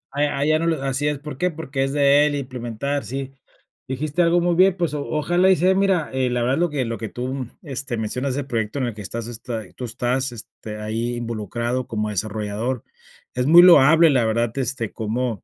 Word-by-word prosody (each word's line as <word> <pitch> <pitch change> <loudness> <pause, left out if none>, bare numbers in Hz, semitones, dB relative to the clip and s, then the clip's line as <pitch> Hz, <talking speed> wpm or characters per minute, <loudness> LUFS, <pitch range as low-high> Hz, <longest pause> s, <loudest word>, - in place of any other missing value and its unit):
allá 145 -1 0
allá 155 +2 +2
no 165 - -1
lo 160 -4 0
así 135 +2 -1
es, 150 -1 -1
¿por 145 -2 -8
qué? 180 +2 0
Porque 145 -4 -3
es 135 - -1
de 145 0 +5
él 150 - 0
implementar, 130 +1 -3
sí. 135 +1 -5 0.6
Dijiste 150 +5 -1
algo 170 +1 +3
muy 175 0 +1
bien, 185 +1 +5
pues 170 -4 -1
o 145 - -3
ojalá 175 +4 +2
y - - +5
sea. 185 +4 +3
Mira, 190 -5 +1
la 125 -2 0
verdad, 125 +3 +1
lo 175 +1 +1
que 140 -4 -1
lo 115 0 -3
que 110 -3 -5
tú, 130 +1 -4
este, 135 - -5
mencionas, 125 +5 -2
el 140 -1 -3
proyecto 115 +1 -2
en 130 - 0
el 120 - -4
que 105 - -8
estás, 115 +3 -5
este, 115 -3 -6
tú 125 - -5
estás, 125 +2 -1
este, 110 -1 -9
ahí 115 +3 -2
involucrado 120 +2 -3
como 105 -3 -2
desarrollador. 110 +4 -3 0.5
Es 125 0 0
muy 170 +4 +8
loable, 165 -1 +7
la 125 -5 +3
verdad, 115 +1 0
este, 125 -3 -2
cómo, 115 0 -3
130 Hz, 210 wpm, -22 LUFS, 115-150 Hz, 0.6 s, muy